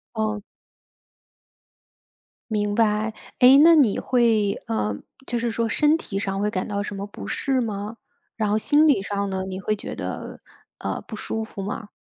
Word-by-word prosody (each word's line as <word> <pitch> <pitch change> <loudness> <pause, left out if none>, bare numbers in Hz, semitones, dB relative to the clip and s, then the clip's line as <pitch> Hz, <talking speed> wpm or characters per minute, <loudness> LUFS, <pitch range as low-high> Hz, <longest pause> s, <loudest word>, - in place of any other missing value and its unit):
哦。 215 -1 -1 2.1
明 205 -1 0
白， 215 0 +1 0.2
哎， 255 +2 +8
那 335 +1 +8
你 260 -10 +4
会 225 -5 +2
呃， 105 -2 -1 0.3
就 240 - -1
是 235 0 -1
说 230 0 -1
身 300 +6 +3
体 200 -10 -6
上 195 0 -2
会 210 - +1
感 185 -3 -2
到 200 -1 -2
什 200 0 -5
么 195 0 -4
不 150 - -9
适 265 - 0
吗？ 210 0 -4 0.4
然 215 -2 0
后 210 - +2
心 295 +7 +4
理 245 -10 +3
上 200 0 -2
呢， 190 0 -2
你 190 0 -5
会 215 +2 0
觉 205 - -7
得， - - -6 0.4
呃， - - -3
不 220 - -9
舒 220 +1 -3
服 210 -2 -7
吗？ 205 +2 -5
210 Hz, 185 characters per minute, -24 LUFS, 200-230 Hz, 2.1 s, 哎